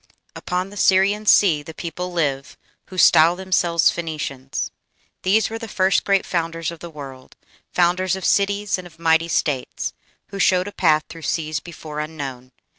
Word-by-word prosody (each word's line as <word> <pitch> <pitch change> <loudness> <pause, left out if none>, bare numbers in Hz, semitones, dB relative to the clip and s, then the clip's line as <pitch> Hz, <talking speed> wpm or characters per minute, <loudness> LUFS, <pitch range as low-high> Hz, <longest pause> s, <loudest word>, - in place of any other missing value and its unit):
Upon 180 +2 -3
the 205 - -11
Syrian 200 +3 +3
sea 170 -9 +5
the 155 +2 -11
people 180 +2 -5
live 140 -6 -2 0.3
Who 185 - -10
style 165 0 +6
themselves 175 -3 +2
Phoenicians.... 140 -5 -4 0.5
These 215 +4 +2
were 225 - -4
the 225 - -7
first 190 -2 +2
great 195 -1 +2
founders 165 -1 -2
of 170 - -10
the 170 - -8
world 135 -4 -11 0.4
Founders 180 +1 +2
of 190 - -6
cities 200 0 +1
and 180 - -9
of 165 -2 -19
mighty 165 0 +2
states 145 -5 -2 0.4
Who 195 - -7
showed 185 0 +3
a - - -5
path 155 -6 +2
through 165 - -11
seas 155 0 -2
before 155 -2 -8
unknown. 140 -5 -6
170 Hz, 165 wpm, -21 LUFS, 155-185 Hz, 0.5 s, style